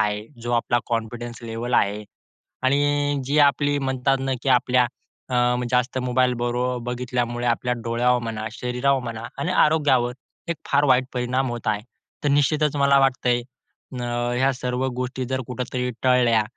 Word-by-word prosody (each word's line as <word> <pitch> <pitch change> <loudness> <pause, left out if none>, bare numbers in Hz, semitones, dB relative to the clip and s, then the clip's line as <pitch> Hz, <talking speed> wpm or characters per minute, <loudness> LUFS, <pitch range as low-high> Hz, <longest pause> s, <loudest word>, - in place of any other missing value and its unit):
आहे, 105 0 -1 0.2
जो 120 - -3
आपला 120 0 +2
कॉन्फिडन्स 120 0 -4
लेव्हल 115 +2 -3
आहे 105 0 +1 0.6
आणि 145 +2 +2
जी 145 +3 +2
आपली 145 +1 +1
म्हणतात 135 0 +1
ना, 135 0 -1
की 135 - 0
आपल्या 125 -1 +3 0.4
अ, 125 - -1 0.4
जास्त 125 +1 +1
मोबाईल 125 0 +2
बरो 120 +1 0 0.2
बघितल्यामुळे 125 -1 -2
आपल्या 120 +1 +1
डोळ्यावर 120 +2 +2
म्हणा, 110 -1 -4
शरीरावर 125 +4 0
म्हणा 115 -1 -5 0.2
आणि 180 - -1
आरोग्यावर 145 -8 +3 0.4
एक 170 - 0
फार 140 0 +3
वाईट 130 -1 +4
परिणाम 125 +1 0
होत 120 -2 -6
आहे. 105 -1 +1 0.4
तर 145 - +2
निश्चितच 150 +1 +2
मला 140 0 +5
वाटतंय 125 -2 +2 0.6
अ, - - -3 0.3
ह्या 135 +2 +3
सर्व 125 +1 -2
गोष्टी 125 0 -3
जर 130 0 -1
कुठेतरी 125 0 -3
टळल्या 125 -3 +4
125 Hz, 150 wpm, -23 LUFS, 120-135 Hz, 0.6 s, मला